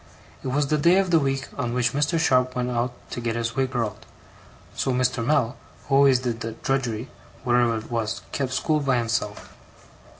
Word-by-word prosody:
It - - -6
was 140 +3 +1
the 150 +2 +1
day 170 +5 +5
of 190 -2 +2
the 165 - +6
week 135 -2 -1
on 120 -3 -1
which 125 0 +1
Mr. 145 +4 +1
Sharp 130 -5 +2
went 125 0 -1
out 120 +1 0 0.2
to 120 - -4
get 115 -1 -1
his 115 0 -2
wig 135 -1 +1
curled; 115 -4 -3 0.7
so 135 - 0
Mr. 125 -1 +1
Mell, 125 -1 +1 0.3
who 140 - -3
always 135 -2 +6
did 120 -2 -3
the 115 -1 -4
drudgery, 125 -1 -2 0.4
whatever 120 -2 +3
it 110 +2 -8
was, 115 -2 -2
kept 135 -2 -2
school 155 +4 +1
by 135 -3 +1
himself. 115 -3 -2
125 Hz, 195 wpm, -24 LUFS, 115-135 Hz, 0.7 s, the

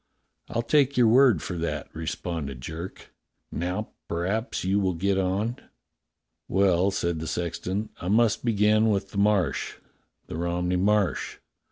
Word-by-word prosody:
"I'll 115 - -1
take 140 +1 +3
your 125 - +6
word 120 - +5
for 90 - -4
that," 75 -4 -3
responded 80 -4 -4
Jerk. 80 +7 -8 0.4
"Now 90 +6 -3 0.2
p'raps 100 +8 -2
you 95 +2 +2
will 95 -3 0
get 95 +3 +1
on.^^" 100 +6 -1 0.9
"Well," 95 -1 +3
said 85 -4 -1
the 80 - -5
sexton, 90 +6 -3
"I 90 - -6
must 110 +2 +3
begin 110 -1 +3
with 100 -2 -1
the 100 - -2
Marsh 100 -7 +1 0.3
— - - -47
the - - -6
Romney 90 +1 0
Marsh. 100 +1 +1
95 Hz, 145 wpm, -26 LUFS, 85-105 Hz, 0.9 s, your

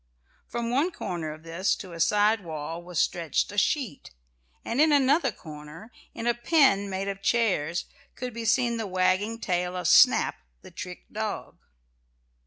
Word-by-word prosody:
From 235 0 -3
one 285 +8 +2
corner 175 - -5
of 155 +1 -11
this 170 +4 0
to 185 - -9
a 165 - -8
side 210 +4 +3
wall 160 0 -5
was 175 -1 -8
stretched 170 0 0
a 205 - -9
sheet, 230 - -1 0.6
and 235 +5 +1
in 310 0 +5
another 280 0 +3
corner, 155 +5 -11 0.2
in 230 - -5
a 240 - +3
pen 240 -6 +3
made 190 +1 -3
of 195 0 -4
chairs, 185 -8 +1 0.3
could 250 -1 -5
be 230 0 -5
seen 235 +1 +2
the 220 -2 -3
wagging 185 +4 +1
tail 180 -3 -1
of 180 -2 -2
Snap, - - +5 0.3
the - - -12
trick - - -8
dog. - - -5
200 Hz, 165 wpm, -27 LUFS, 175-235 Hz, 0.6 s, in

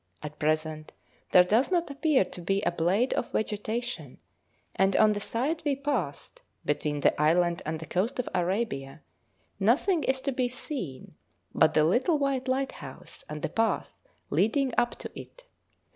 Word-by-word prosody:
At 150 0 -7
present 155 0 -1 0.4
there 180 - +7
does 220 +8 +2
not 345 -5 0
appear 280 - +2
to 180 - -10
be 195 +4 0
a - - +2
blade 180 +9 +1
of - - -2
vegetation, 215 - -3 0.6
and 195 0 +2
on 215 -1 +5
the 205 - -3
side 270 +10 -1
we 290 -2 +1
passed, 265 - -3 0.2
between 145 0 -1
the 145 - +2
island 170 +2 +3
and 160 0 -2
the 165 - -7
coast 195 - -1
of 250 - -2
Arabia, 180 -6 -2 0.6
nothing 290 - +3
is 265 +1 +1
to 275 - -1
be 250 -1 0
seen 245 - -6 0.4
but 155 - +4
the 155 - +5
little 250 - +3
white 275 -2 -1
lighthouse 265 +1 -4
and 150 0 -6
the - - 0
path 225 0 0 0.4
leading 260 +4 +2
up 240 0 +1
to - - -8
it. - - -11
215 Hz, 160 wpm, -28 LUFS, 165-265 Hz, 0.6 s, there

